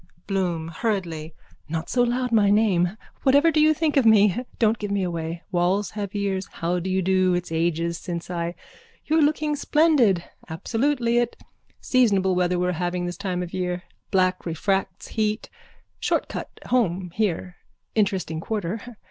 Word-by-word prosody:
BLOOM: 175 Hz, -5 st, -1 dB
(Hurriedly.) 170 Hz, -5 st, -3 dB, 0.3 s
Not 160 Hz, +1 st, -3 dB
so 245 Hz, -, +1 dB
loud 245 Hz, +1 st, +1 dB
my 210 Hz, -3 st, +4 dB
name. 200 Hz, -3 st, +2 dB, 0.2 s
Whatever 285 Hz, +5 st, +5 dB
do 310 Hz, -, +3 dB
you 310 Hz, +1 st, +6 dB
think 310 Hz, -1 st, +1 dB
of 275 Hz, -, +5 dB
me? 210 Hz, -3 st, +6 dB, 0.2 s
Don't 220 Hz, -1 st, +2 dB
give 205 Hz, -, -3 dB
me 200 Hz, -1 st, 0 dB
away. 170 Hz, -1 st, -4 dB
Walls 185 Hz, +3 st, +1 dB
have 205 Hz, -1 st, -5 dB
ears. 195 Hz, -1 st, -1 dB
How 175 Hz, +2 st, -1 dB
do 180 Hz, +2 st, -4 dB
you 190 Hz, 0 st, +1 dB
do? 185 Hz, 0 st, +3 dB
It's 175 Hz, -1 st, -3 dB
ages 165 Hz, +1 st, 0 dB
since 170 Hz, -3 st, -5 dB
I. 170 Hz, 0 st, -2 dB, 0.5 s
You're 315 Hz, +1 st, +3 dB
looking 300 Hz, 0 st, +2 dB
splendid. 285 Hz, -, +3 dB, 0.3 s
Absolutely 235 Hz, -, 0 dB
it. 240 Hz, -1 st, -1 dB, 0.4 s
Seasonable 200 Hz, -7 st, +3 dB
weather 180 Hz, 0 st, +1 dB
we 180 Hz, -, +1 dB
are -, -, +1 dB
having 175 Hz, +1 st, -2 dB
this 175 Hz, 0 st, -4 dB
time 185 Hz, -3 st, -2 dB
of 175 Hz, -, -8 dB
year. 180 Hz, -1 st, -2 dB, 0.3 s
Black 185 Hz, -1 st, +2 dB
refracts 190 Hz, +3 st, -2 dB
heat. 215 Hz, -1 st, -1 dB, 0.5 s
Short -, -, 0 dB
cut -, -, -5 dB, 0.2 s
home 185 Hz, -7 st, 0 dB
here. 185 Hz, -4 st, -1 dB, 0.4 s
Interesting 190 Hz, -6 st, 0 dB
quarter. 215 Hz, +5 st, -4 dB
190 Hz, 160 wpm, -24 LUFS, 175-225 Hz, 0.5 s, you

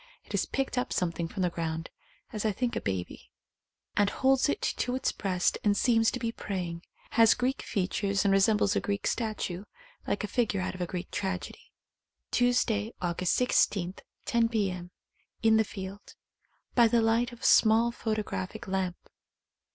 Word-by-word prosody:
It -, -, -15 dB
has -, -, 0 dB
picked 270 Hz, -2 st, -1 dB
up 250 Hz, -, -3 dB
something 170 Hz, -1 st, -1 dB
from 190 Hz, +2 st, -3 dB
the 180 Hz, -, +1 dB
ground 165 Hz, -1 st, -4 dB, 0.4 s
(as 215 Hz, -, -3 dB
I 215 Hz, -, +2 dB
think 240 Hz, +4 st, -2 dB
a -, -, -1 dB
baby) 95 Hz, -2 st, -4 dB, 0.7 s
and 205 Hz, 0 st, +3 dB
holds 265 Hz, +4 st, +2 dB
it -, -, -1 dB
to 250 Hz, 0 st, -1 dB
its 260 Hz, -, 0 dB
breast 185 Hz, -3 st, 0 dB
and 205 Hz, -1 st, +3 dB
seems 225 Hz, -1 st, +4 dB
to 250 Hz, -, -4 dB
be 230 Hz, -1 st, -1 dB
praying. 180 Hz, -6 st, -4 dB, 0.3 s
Has 225 Hz, -1 st, +6 dB
Greek 255 Hz, +2 st, -1 dB
features 195 Hz, +1 st, -1 dB
and 200 Hz, -, +4 dB
re 195 Hz, -, +5 dB
sembles 205 Hz, 0 st, +3 dB
a -, -, +3 dB
Greek 200 Hz, 0 st, -3 dB
statue 210 Hz, -5 st, -2 dB, 0.2 s
— -, -, -26 dB
like 205 Hz, -, -1 dB
a -, -, -1 dB
figure 210 Hz, -2 st, 0 dB
out 185 Hz, -, -2 dB
of 185 Hz, -, -7 dB
a 175 Hz, -, -1 dB
Greek 180 Hz, 0 st, -5 dB
tragedy. 190 Hz, -2 st, -4 dB, 0.6 s
(Tuesday, 240 Hz, -3 st, +2 dB
August 175 Hz, 0 st, 0 dB
16, 195 Hz, -7 st, +2 dB, 0.3 s
10 235 Hz, -1 st, +2 dB
p.m. 190 Hz, -6 st, -1 dB, 0.5 s
In 220 Hz, 0 st, +5 dB
the 220 Hz, -, +4 dB
field.) 195 Hz, -1 st, -8 dB, 0.6 s
By 235 Hz, -2 st, +6 dB
the 230 Hz, 0 st, +3 dB
light 230 Hz, +2 st, +2 dB
of 240 Hz, -, -13 dB
a -, -, -4 dB
small 225 Hz, +2 st, +5 dB
photographic 215 Hz, -, -3 dB
lamp. 190 Hz, -2 st, -1 dB
205 Hz, 175 wpm, -29 LUFS, 185-230 Hz, 0.7 s, Has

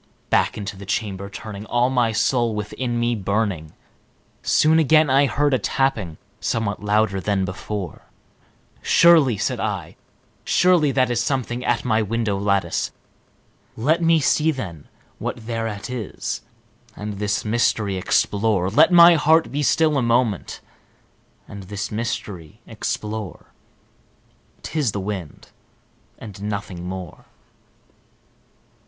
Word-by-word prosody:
Back -, -, +2 dB
into 100 Hz, -1 st, -5 dB
the 100 Hz, 0 st, -11 dB
chamber 100 Hz, -2 st, -3 dB
turning, 105 Hz, 0 st, -8 dB
all 120 Hz, +2 st, +1 dB
my 120 Hz, -3 st, +2 dB
soul 115 Hz, 0 st, +1 dB
within 120 Hz, +3 st, -3 dB
me 120 Hz, 0 st, +1 dB
burning, 100 Hz, -6 st, -2 dB, 0.7 s
Soon 160 Hz, +1 st, +3 dB
again 155 Hz, -1 st, +4 dB
I 140 Hz, +1 st, +4 dB
heard 145 Hz, +1 st, +1 dB
a 130 Hz, -, +2 dB
tapping, 110 Hz, -, -1 dB, 0.2 s
somewhat 105 Hz, -3 st, -2 dB
louder 105 Hz, -1 st, +1 dB
than 100 Hz, -1 st, 0 dB
before. 95 Hz, +1 st, -6 dB, 0.7 s
"Surely," 160 Hz, -9 st, +5 dB
said -, -, -2 dB
I, -, -, -4 dB, 0.5 s
"surely 175 Hz, -5 st, +3 dB
that 130 Hz, -2 st, +1 dB
is 120 Hz, -1 st, +1 dB
something 125 Hz, -1 st, -2 dB
at 120 Hz, -, 0 dB
my 110 Hz, -2 st, +2 dB
window 110 Hz, -1 st, -1 dB
lattice; 100 Hz, -4 st, 0 dB, 0.9 s
Let 155 Hz, +9 st, +1 dB
me 165 Hz, -1 st, +4 dB
see, 155 Hz, +2 st, +2 dB
then, 95 Hz, -, -5 dB, 0.3 s
what 115 Hz, -, -5 dB
thereat 115 Hz, -3 st, -4 dB
is, 115 Hz, -6 st, -4 dB, 0.5 s
and 105 Hz, -1 st, -6 dB
this 105 Hz, +1 st, -1 dB
mystery 105 Hz, -3 st, +1 dB
explore 100 Hz, 0 st, +1 dB
Let 155 Hz, -, +5 dB
my 170 Hz, 0 st, +9 dB
heart 160 Hz, +1 st, +3 dB
be 145 Hz, -, -1 dB
still 155 Hz, +1 st, +2 dB
a -, -, 0 dB
moment 120 Hz, -5 st, 0 dB, 0.9 s
and 100 Hz, -, -9 dB
this 100 Hz, +2 st, -5 dB
mystery 105 Hz, -4 st, -5 dB
explore; 105 Hz, -3 st, -5 dB, 1.1 s
'T 155 Hz, -, -3 dB
is 125 Hz, -9 st, 0 dB
the 100 Hz, -, -2 dB
wind 95 Hz, -6 st, -6 dB, 0.7 s
and 100 Hz, -3 st, -10 dB
nothing 100 Hz, -4 st, -5 dB
more!" 90 Hz, -2 st, -8 dB
110 Hz, 125 wpm, -22 LUFS, 100-130 Hz, 1.1 s, my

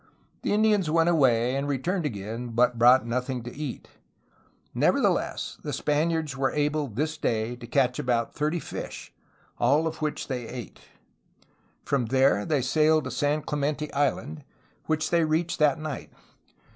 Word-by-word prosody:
The -, -, -1 dB
Indians 210 Hz, -5 st, +3 dB
went 165 Hz, +1 st, +3 dB
away 130 Hz, -6 st, +3 dB
and 140 Hz, +1 st, -1 dB
returned 155 Hz, +5 st, -1 dB
again, 110 Hz, +1 st, -5 dB
but 120 Hz, 0 st, +3 dB
brought 125 Hz, +1 st, +6 dB
nothing 125 Hz, +1 st, -2 dB
to 120 Hz, -, -8 dB
eat. 145 Hz, -3 st, -6 dB, 0.9 s
Nevertheless, -, -, +1 dB
the -, -, -5 dB
Spaniards 155 Hz, -1 st, 0 dB
were 135 Hz, 0 st, +1 dB
able 150 Hz, 0 st, 0 dB
this 155 Hz, +7 st, -3 dB
day 115 Hz, -2 st, -1 dB
to 120 Hz, -1 st, -10 dB
catch 125 Hz, 0 st, +1 dB
about 120 Hz, -2 st, 0 dB
thirty 150 Hz, +3 st, -1 dB
fish, -, -, -7 dB, 0.5 s
all 145 Hz, +7 st, +3 dB
of 160 Hz, 0 st, -4 dB
which 150 Hz, -1 st, -2 dB
they 125 Hz, -4 st, -4 dB
ate. 120 Hz, -6 st, -8 dB, 1.1 s
From 130 Hz, -5 st, 0 dB
there 130 Hz, -4 st, +3 dB
they 145 Hz, -5 st, +1 dB
sailed 155 Hz, +3 st, +3 dB
to 130 Hz, -, -5 dB
San 145 Hz, +4 st, 0 dB
Clemente 150 Hz, +1 st, -2 dB
Island, 145 Hz, +1 st, -1 dB, 0.4 s
which 155 Hz, -1 st, 0 dB
they 170 Hz, -1 st, +3 dB
reached 160 Hz, +2 st, 0 dB
that 150 Hz, -3 st, +4 dB
night. 155 Hz, -2 st, -6 dB
145 Hz, 150 wpm, -26 LUFS, 125-155 Hz, 1.1 s, brought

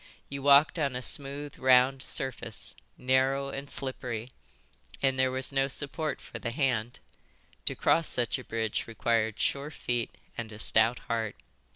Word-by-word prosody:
You 140 Hz, 0 st, -5 dB
walked 145 Hz, +5 st, +5 dB
on 140 Hz, -4 st, 0 dB
a 125 Hz, -, -3 dB
smooth, 140 Hz, +1 st, -1 dB
round 130 Hz, +1 st, +4 dB
surface, 130 Hz, -5 st, +1 dB, 0.2 s
narrow 135 Hz, +2 st, +1 dB
and 140 Hz, +1 st, -6 dB
slippery, 125 Hz, -3 st, -2 dB, 0.7 s
and 135 Hz, -1 st, +1 dB
there 130 Hz, 0 st, +3 dB
was 130 Hz, +1 st, -3 dB
no 135 Hz, 0 st, +2 dB
support 145 Hz, +3 st, -3 dB
for -, -, -9 dB
the 115 Hz, -, -3 dB
hand. 120 Hz, -3 st, -1 dB, 0.7 s
To -, -, +2 dB
cross 165 Hz, -1 st, +3 dB
such 120 Hz, -2 st, -1 dB
a -, -, -9 dB
bridge 110 Hz, -1 st, -2 dB
required 115 Hz, -1 st, 0 dB
sure 140 Hz, +1 st, -1 dB
feet 120 Hz, -6 st, -3 dB, 0.2 s
and 115 Hz, -2 st, -5 dB
a 105 Hz, -, -9 dB
stout 115 Hz, +2 st, +4 dB
heart. 115 Hz, -2 st, -2 dB
130 Hz, 155 wpm, -29 LUFS, 115-140 Hz, 0.7 s, walked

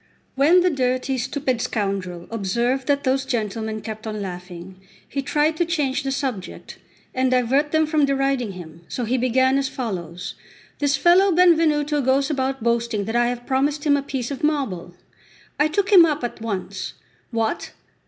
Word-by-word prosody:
When 310 Hz, +7 st, +5 dB
the 360 Hz, 0 st, +3 dB
dirty 255 Hz, -1 st, 0 dB
stupid 260 Hz, -1 st, -1 dB
scoundrel 195 Hz, -6 st, -3 dB
observed 235 Hz, +5 st, -1 dB
that 285 Hz, -1 st, +1 dB
those 265 Hz, 0 st, +1 dB
gentlemen 220 Hz, -2 st, -3 dB
kept 220 Hz, +1 st, -7 dB
on 215 Hz, -1 st, -4 dB
laughing, 180 Hz, -1 st, -8 dB, 0.3 s
he 275 Hz, -, -3 dB
tried 300 Hz, +3 st, +1 dB
to 345 Hz, -, +3 dB
change 295 Hz, -6 st, 0 dB
the 270 Hz, -1 st, -3 dB
subject, 260 Hz, -9 st, -5 dB, 0.3 s
and 260 Hz, 0 st, +1 dB
divert 255 Hz, +4 st, +2 dB
them 315 Hz, 0 st, +3 dB
from 305 Hz, -1 st, +2 dB
deriding 270 Hz, -5 st, 0 dB
him; 170 Hz, -2 st, -11 dB
so 245 Hz, -, -3 dB
he 250 Hz, +3 st, 0 dB
began 260 Hz, +2 st, +3 dB
as 275 Hz, -1 st, -1 dB
follows: 180 Hz, -9 st, -5 dB, 0.5 s
"This 285 Hz, -1 st, +2 dB
fellow 360 Hz, +6 st, +5 dB
Benvenuto 315 Hz, -4 st, +3 dB
goes 270 Hz, +2 st, +2 dB
about 265 Hz, -3 st, -2 dB
boasting 235 Hz, -3 st, 0 dB
that 225 Hz, -, -3 dB
I 240 Hz, 0 st, +3 dB
have 245 Hz, 0 st, -4 dB
promised 285 Hz, +2 st, 0 dB
him 290 Hz, -2 st, +4 dB
a 285 Hz, -, 0 dB
piece 270 Hz, -2 st, -4 dB
of 275 Hz, -, -5 dB
marble." 215 Hz, -, -1 dB, 0.6 s
I 295 Hz, -, +4 dB
took 390 Hz, +6 st, -1 dB
him 370 Hz, -4 st, +9 dB
up 305 Hz, -4 st, 0 dB
at 240 Hz, -2 st, -4 dB
once. 210 Hz, -5 st, -4 dB, 0.4 s
"What! 225 Hz, -2 st, -2 dB
260 Hz, 170 wpm, -22 LUFS, 220-285 Hz, 0.6 s, him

